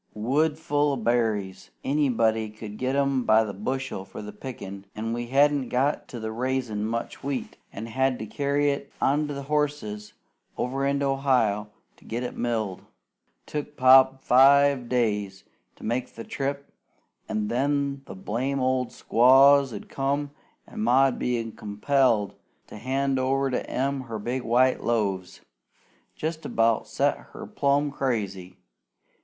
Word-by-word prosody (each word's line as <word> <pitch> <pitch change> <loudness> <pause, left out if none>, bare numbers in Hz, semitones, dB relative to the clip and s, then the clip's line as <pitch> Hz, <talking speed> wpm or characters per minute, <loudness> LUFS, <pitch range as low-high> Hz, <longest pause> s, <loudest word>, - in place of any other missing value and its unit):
Woods 145 +8 +1
full 145 -2 +1
o' - - 0
berries! 110 -5 -1
Anybody 115 -6 +1
could 105 0 -9
get 130 +1 -1
'em 140 -2 +1
by 110 -1 +5
the 105 -2 -5
bushel 130 +1 -3
for 95 +2 -9
the 105 - -7
pickin', 100 -4 -8
an' 115 +1 -3
we 120 0 -3
hadn't 140 0 +3
got 135 +4 0
on 120 - -6
to 110 - -3
raisin' 120 -3 -2
much 115 +1 -4
wheat, 140 -1 -3 0.2
an' 110 - -6
had 130 +2 0
to 110 - -6
carry 145 +4 0
it 140 0 -5
on 150 +2 +1
horses 140 -7 -2 0.4
over 135 +2 -1
into 140 0 0
Ohio 125 -7 +1 0.3
to - - -21
get 120 +2 -3
it 125 - -5
milled. 110 -6 -2 0.6
Took 150 0 -5
Pa 130 0 +7
five 135 0 +5
days 105 -5 -1 0.3
to - - -16
make 120 +3 -2
the 115 - -7
trip; 140 +2 -4 0.6
an' 110 -1 -1
then 140 +3 0
the - - -9
blame 125 +8 -2
old 130 -1 0
squaws 135 +3 +5
'ud - - -8
come, 140 +1 -2 0.3
an' 225 - -10
Ma 135 - +4
'ud 130 - -6
be 115 -2 -1
compelled 110 0 +1 0.3
to - - -11
hand 135 +3 0
over 135 +1 +1
to - - -3
'em 135 +1 -1
her 115 -3 -6
big 120 +5 -3
white 125 +2 +2
loaves. 100 -6 -1 0.7
Jest 160 +1 -4
about 115 -1 +1
set - - +1 0.2
her - - -8
plumb 140 +1 +1
crazy. 100 -9 -3
130 Hz, 150 wpm, -26 LUFS, 110-140 Hz, 0.7 s, Pa